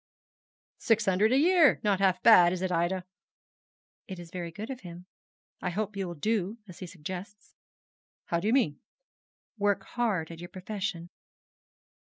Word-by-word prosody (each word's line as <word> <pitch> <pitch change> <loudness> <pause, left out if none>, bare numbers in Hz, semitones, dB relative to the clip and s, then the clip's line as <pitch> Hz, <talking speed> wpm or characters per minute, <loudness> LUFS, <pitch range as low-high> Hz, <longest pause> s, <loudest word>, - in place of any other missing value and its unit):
'Six 225 -3 +2
hundred 195 +3 +3
a 260 - +4
year. 335 0 +5
Not 200 -3 +2
half 185 -2 +2
bad, 180 -7 +8
is 185 0 -4
it, 185 - -1
Ida?' 180 +2 0 1.0
'It 190 - -7
is 170 -1 -10
very 175 -2 -5
good 215 +9 -7
of 260 - -6
him. 175 -2 -10 0.6
I - - -1
hope 210 +3 -3
you 195 -2 -3
will 175 - -6
do 210 +4 -1
as 180 - -12
he 185 - -6
suggests.' 185 +5 -8 0.7
'How 170 - 0
do 190 - -2
you 225 - +3
mean?' 200 - +2 0.8
'Work 205 -1 +1
hard 205 -10 -2
at 165 - -9
your 175 0 -8
profession.' 185 -2 -5
190 Hz, 165 wpm, -29 LUFS, 175-215 Hz, 1.0 s, bad